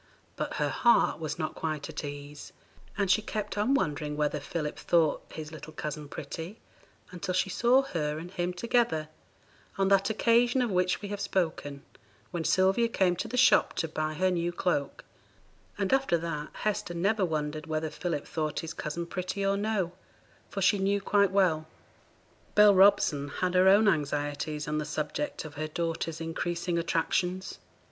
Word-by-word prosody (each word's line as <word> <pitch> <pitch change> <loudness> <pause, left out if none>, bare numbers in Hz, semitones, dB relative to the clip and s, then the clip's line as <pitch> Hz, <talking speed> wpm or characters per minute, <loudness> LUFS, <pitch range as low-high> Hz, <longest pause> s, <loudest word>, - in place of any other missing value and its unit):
But - - -3
her - - 0
heart 235 -8 +3
was 155 0 -4
not 155 -2 -3
quite 155 -3 -3
at - - -6
ease, 145 0 -8 0.4
and 200 -3 +2
she 185 - +4
kept 210 -1 -4
on 215 +7 +2
wondering 150 - -1
whether 150 0 0
Philip 150 +1 -4
thought 165 -4 +2
his 155 -1 -7
little 155 0 -10
cousin 150 0 -5
pretty 165 +10 -7 0.5
until 180 0 -3
she 185 +1 +1
saw 250 +6 +4
her 150 - -2
and 170 +3 -8
him 180 -1 -2
together, 180 -6 0 0.7
on 195 0 +2
that 195 0 +4
occasion 240 +3 +3
of 235 - -1
which 180 +2 +1
we 205 - -4
have 205 -1 -4
spoken, 155 -6 -2 0.5
when 170 -2 -3
Sylvia 190 +7 +3
came 190 -5 +2
to 190 - -3
the 245 +3 -4
shop 255 - +5
to 165 - -1
buy 155 0 -3
her 185 +3 +2
new 175 -1 0
cloak; 170 -5 -2 0.7
and 200 +3 0
after 270 -10 +3
that 160 -3 -4
Hester 205 -4 -2
never 200 +4 +1
wondered 155 -2 -2
whether 155 0 -2
Philip 170 -5 -3
thought 155 -2 -2
his 165 0 -6
cousin 170 +2 -4
pretty 185 +3 -3
or 195 0 +2
no, 200 -4 -1 0.6
for 195 - -3
she 200 +1 +4
knew 200 +1 +1
quite 200 0 +3
well. 175 -5 +2 0.9
Bell 210 -1 +8
Robson 190 -7 +4
had 180 +5 -2
her 185 +1 +5
own 205 +3 +6
anxieties 150 -2 -1
on 150 0 -1
the - - -1
subject 150 0 -3
of 155 - -8
her 155 +1 -3
daughter's 165 0 -3
increasing 170 +1 -2
attractions. 180 +3 -1
175 Hz, 170 wpm, -29 LUFS, 155-195 Hz, 0.9 s, Bell